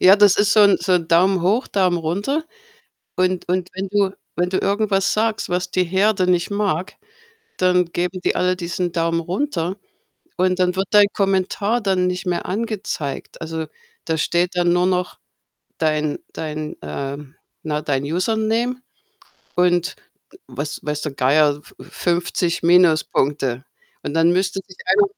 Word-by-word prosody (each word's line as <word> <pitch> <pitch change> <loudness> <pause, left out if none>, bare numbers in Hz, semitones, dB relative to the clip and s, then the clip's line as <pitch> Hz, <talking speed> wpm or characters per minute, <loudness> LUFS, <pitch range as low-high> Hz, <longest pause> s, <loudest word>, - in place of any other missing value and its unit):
Ja, 190 +2 +8
das 205 -2 +5
ist 205 0 +3
so 215 - +5
'n 200 -1 +6
so 185 +2 0
'n 170 -3 +1
Daumen 180 +2 +3
hoch, 210 +8 +2
Daumen 185 -3 +1
runter. 205 - -2 0.7
Und 185 -1 0
und 180 0 0
wenn 190 +1 -4
du 200 -1 +2 0.2
wenn 175 0 0
du 190 - +1
irgendwas 200 -1 +1
sagst, 220 0 0
was 180 +1 -2
die 185 - +2
Herde 190 +2 +1
nicht 175 +2 +1
mag, 195 -4 -1 0.6
dann 180 -1 +3
geben 180 +1 -2
die - - +2
alle 180 0 +1
diesen 175 0 -3
Daumen 165 -1 0
runter, 180 - -2 0.6
und 185 0 +1
dann 180 0 +1
wird 190 +1 0
dein 205 -1 +7
Kommentar 195 +3 0
dann 190 -4 +1
nicht 180 0 -3
mehr 175 -1 -1
angezeigt. 200 - -4
Also, 160 -1 -4 0.4
da 160 -1 -1
steht 175 +3 +1
dann 175 -1 +3
nur 180 - +2
noch 180 -1 -1 0.6
dein 155 -1 0
dein 155 -1 -5
ähm, 140 - -6 0.3
na, 150 -1 -2
dein 135 -2 -1
Username 220 - 0 0.8
und 175 0 +2 0.5
weiß 145 +1 -5
weiß 150 0 -3
der 150 - -3
Geier, 145 +2 +3
f - - -19
50 175 0 -1
Minuspunkte. 155 -7 +2 0.4
Und, 145 - -5
dann 165 +1 +4
müsste 190 +1 0
sich - - -14
einer 415 - +5
180 Hz, 155 wpm, -21 LUFS, 165-195 Hz, 0.8 s, Ja